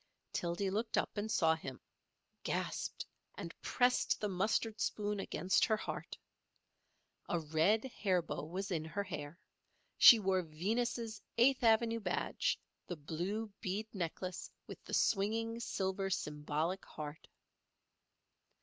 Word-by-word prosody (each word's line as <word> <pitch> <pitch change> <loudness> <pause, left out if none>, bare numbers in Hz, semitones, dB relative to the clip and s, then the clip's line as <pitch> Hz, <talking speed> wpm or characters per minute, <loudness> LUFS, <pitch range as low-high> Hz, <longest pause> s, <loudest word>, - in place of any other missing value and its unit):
Tildy 175 +3 -1
looked 220 +3 -1
up - - 0
and 210 +1 -2
saw 160 -5 +4
him, 135 -5 -6 0.6
gasped, - - -2 0.3
and 170 - -6
pressed 250 0 +2
the 210 - 0
mustard 215 +3 0
spoon 205 0 -1
against 190 -1 +1
her 220 - +2
heart. - - -5 1.1
A 175 - +1
red 160 +8 +2
hair 195 -8 0
bow 155 - -4
was 190 +5 -4
in 165 -3 0
her 180 +6 -3
hair; 160 -4 -6 0.6
she 235 - +11
wore 190 -3 +2
Venus's 220 +7 -2 0.2
Eighth 260 +3 +5
Avenue 230 0 +4
badge, 180 -5 0 0.3
the 175 - -3
blue 180 +9 -3
bead 205 +1 -2
necklace 180 -1 -4 0.2
with - - -10
the - - -8
swinging 225 +3 +1
silver 195 -3 -1
symbolic 150 +2 -1
heart. 150 +1 -8
195 Hz, 125 wpm, -35 LUFS, 170-220 Hz, 1.1 s, she